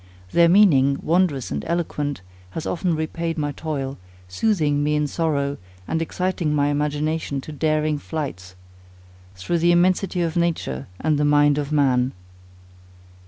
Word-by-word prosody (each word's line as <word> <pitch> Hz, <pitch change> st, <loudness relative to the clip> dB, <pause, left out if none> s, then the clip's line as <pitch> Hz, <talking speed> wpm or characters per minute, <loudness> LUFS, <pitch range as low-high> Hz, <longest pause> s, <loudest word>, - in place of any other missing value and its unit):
Their 170 Hz, 0 st, +5 dB
meaning, 145 Hz, -8 st, +5 dB
wondrous 165 Hz, -6 st, +1 dB
and 70 Hz, -1 st, -3 dB
eloquent, 150 Hz, -, -2 dB, 0.4 s
has 160 Hz, -, -4 dB
often 175 Hz, -1 st, 0 dB
repaid 165 Hz, +1 st, -3 dB
my 145 Hz, -1 st, -1 dB
toil, 140 Hz, -4 st, -4 dB, 0.3 s
soothing 145 Hz, -, +1 dB
me 150 Hz, +1 st, +1 dB
in 150 Hz, 0 st, +1 dB
sorrow, 145 Hz, -2 st, -1 dB, 0.3 s
and 160 Hz, -, -1 dB
exciting 170 Hz, -2 st, -1 dB
my 145 Hz, 0 st, +2 dB
imagination 150 Hz, 0 st, -1 dB
to 155 Hz, -, -9 dB
daring 155 Hz, 0 st, 0 dB
flights, 130 Hz, -, -6 dB, 0.8 s
through 165 Hz, -, -1 dB
the 170 Hz, +1 st, +4 dB
immensity 180 Hz, +1 st, +2 dB
of 165 Hz, -1 st, -2 dB
nature 165 Hz, -, -1 dB
and 155 Hz, -1 st, +1 dB
the -, -, +2 dB
mind 145 Hz, 0 st, +4 dB
of 145 Hz, 0 st, -4 dB
man. 130 Hz, -4 st, +2 dB
150 Hz, 140 wpm, -22 LUFS, 140-170 Hz, 0.8 s, Their